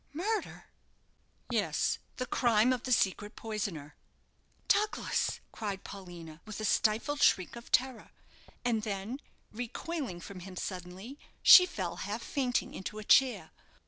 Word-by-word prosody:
"Murder?" 415 +7 -3 0.9
"Yes; - - +1 0.2
the 255 - -2
crime 240 -1 +3
of 250 - -3
the 255 - -3
secret 205 -1 +1
poisoner!" 195 -10 -4 0.7
"Douglas!" 425 +1 +1
cried 200 -3 -5
Paulina, 170 -5 -10
with 215 -1 -8
a 215 - -2
stifled 225 +8 +1
shriek 185 +3 +3
of 235 0 -11
terror; 255 -3 +1 0.6
and 230 -3 +1
then, 210 +4 -4 0.3
recoiling 245 - -5
from 185 +2 -9
him 185 +1 -9
suddenly, 185 +9 -6 0.2
she 360 -1 +10
fell 175 - -4
half 210 +5 -4
fainting 255 -4 -1
into 200 +3 -6
a 215 - -6
chair. 255 +3 +4
215 Hz, 130 wpm, -31 LUFS, 190-255 Hz, 0.9 s, she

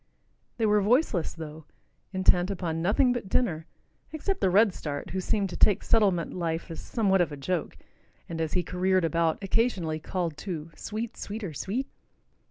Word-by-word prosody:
They 225 - +1
were 210 -1 +4
voiceless, 210 - +2
though, 160 -1 -8 0.5
intent 185 -1 +3
upon 170 -4 -2
nothing 225 +8 +3
but 235 -6 -4
dinner, 165 -11 0 0.4
except 385 +5 -2
the - - +4
redstart, 180 -7 +1
who 190 - -1
seemed 200 -1 0
to - - -5
take 205 - +4
settlement 195 -7 +2
life 165 -1 -3
as 165 - -6
somewhat 195 -5 +2
of 170 - +1
a 145 - -6
joke 175 +5 -2 0.5
and, 165 -1 -4
as 160 -1 -2
he 180 - +1
careered 185 +1 +1
about, 165 0 +1
occasionally 190 -7 0
called 170 -1 -3
to 165 -4 -5
"sweet, 225 +2 -5
sweeter, 205 -5 -5
sweet." 220 - -2
185 Hz, 165 wpm, -28 LUFS, 165-210 Hz, 0.5 s, were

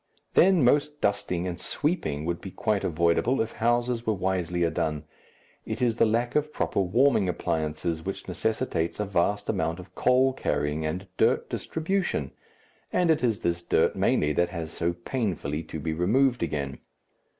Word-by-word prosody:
Then 185 -4 +5
most 145 +3 +2
dusting 100 -5 0
and 90 0 -4
sweeping 90 - -1
would 85 0 -2
be 95 - -7
quite 105 +1 -1
avoidable 85 - +2
if 110 0 0
houses 120 +1 0
were 110 -2 0
wiselier 90 -3 0
done. 75 -1 -2 0.6
It 110 +1 -4
is 120 -2 +1
the 115 - +4
lack 120 +2 0
of 150 0 +1
proper - - -1
warming 105 +1 +3
appliances 80 -1 -2
which 95 - -5
necessitates 90 -3 -1
a 105 - 0
vast 100 +2 0
amount 80 +1 -1
of 90 0 -12
coal 130 +4 +3
carrying 75 - -1
and 90 +5 -4
dirt - - +2
distribution, 160 - -1 0.6
and 175 -2 +3
it 155 -4 +1
is 115 -4 +1
this 85 0 -1
dirt - - +2
mainly 75 0 +2
that 85 +4 +1
has 85 -3 -5
so 85 0 -1
painfully 85 - -2
to 80 - -6
be 80 +2 -2
removed 120 +10 +2
again. 70 -4 -3
95 Hz, 160 wpm, -27 LUFS, 85-120 Hz, 0.6 s, Then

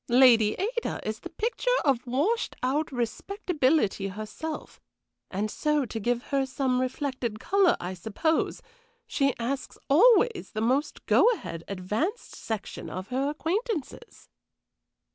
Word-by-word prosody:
Lady 235 -4 +6
Ada 470 +5 -2
is 215 0 -3
the 350 - -8
picture 460 +8 -2 0.2
of 265 -3 +2
washed 315 - 0
out 290 +5 0
respectability 265 - 0
herself, 215 +10 -6 0.5
and 205 +3 -2
so 300 -2 +1
to 225 -1 -5
give 240 +3 0
her 275 -1 +3
some 260 -1 0
reflected 255 -4 -2
color, 390 - +3
I 180 +1 -4
suppose 220 - -1 0.4
she 275 -2 +1
asks 260 +4 -3
always 450 - +5
the - - 0
most 255 +7 0
go - - +5
ahead, 165 - -6
advanced 210 - -3
section 220 -3 -5
of 185 +2 -6
her 265 +3 0
acquaintances." 370 - -3
270 Hz, 125 wpm, -27 LUFS, 225-330 Hz, 0.5 s, Lady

